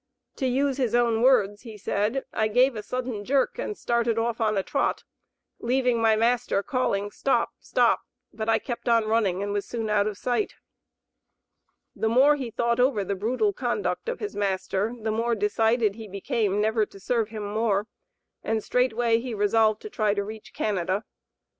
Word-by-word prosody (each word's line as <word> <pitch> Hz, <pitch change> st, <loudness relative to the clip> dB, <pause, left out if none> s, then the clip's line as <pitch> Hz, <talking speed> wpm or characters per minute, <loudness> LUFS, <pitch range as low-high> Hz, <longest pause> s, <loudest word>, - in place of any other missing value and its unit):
To 265 Hz, -, 0 dB
use 270 Hz, +1 st, +1 dB
his 245 Hz, -4 st, 0 dB
own 235 Hz, -2 st, +2 dB
words, 205 Hz, -6 st, +3 dB
he 225 Hz, -3 st, -10 dB
said: 210 Hz, +6 st, -1 dB
"I 220 Hz, -, +1 dB
gave 250 Hz, +4 st, +3 dB
a 215 Hz, -, -4 dB
sudden 245 Hz, -2 st, -4 dB
jerk 275 Hz, -, +1 dB
and 425 Hz, -4 st, -3 dB
started 235 Hz, -1 st, 0 dB
off 230 Hz, 0 st, -1 dB
on 215 Hz, -2 st, +1 dB
a 195 Hz, -, +1 dB
trot, -, -, -1 dB, 0.6 s
leaving 250 Hz, -1 st, +1 dB
my 225 Hz, -1 st, +4 dB
master 230 Hz, -2 st, +1 dB
calling, 205 Hz, -7 st, -1 dB
'stop! 270 Hz, -, 0 dB
stop!' -, -, +2 dB, 0.3 s
but 220 Hz, 0 st, -3 dB
I -, -, +4 dB
kept 240 Hz, 0 st, -4 dB
on 230 Hz, -2 st, +4 dB
running, 210 Hz, -4 st, +1 dB
and 205 Hz, 0 st, -2 dB
was 205 Hz, -1 st, -2 dB
soon 225 Hz, -3 st, -3 dB
out 205 Hz, 0 st, +3 dB
of 210 Hz, -2 st, -4 dB
sight." 250 Hz, -, -1 dB, 1.4 s
The 220 Hz, -, 0 dB
more 270 Hz, +6 st, +5 dB
he 260 Hz, -5 st, -4 dB
thought 235 Hz, +1 st, 0 dB
over 245 Hz, -5 st, +3 dB
the 200 Hz, -, -2 dB
brutal 250 Hz, -, 0 dB
conduct 470 Hz, -, -2 dB
of 485 Hz, -, -4 dB
his 420 Hz, -, -5 dB
master 195 Hz, +1 st, -1 dB
the 220 Hz, 0 st, -2 dB
more 230 Hz, +2 st, 0 dB
decided 220 Hz, +1 st, +2 dB
he 220 Hz, +1 st, -9 dB
became 205 Hz, 0 st, -1 dB
never 215 Hz, 0 st, +1 dB
to 195 Hz, -, -14 dB
serve 225 Hz, +2 st, 0 dB
him 215 Hz, -1 st, -6 dB
more, 210 Hz, -1 st, 0 dB, 0.6 s
and 220 Hz, -1 st, -1 dB
straightway 240 Hz, -2 st, +2 dB
he 240 Hz, -1 st, -5 dB
resolved 215 Hz, +1 st, +2 dB
to -, -, -6 dB
try 215 Hz, -, +1 dB
to 200 Hz, -, 0 dB
reach 215 Hz, +1 st, -9 dB
Canada. 195 Hz, 0 st, -1 dB
225 Hz, 180 wpm, -26 LUFS, 210-245 Hz, 1.4 s, more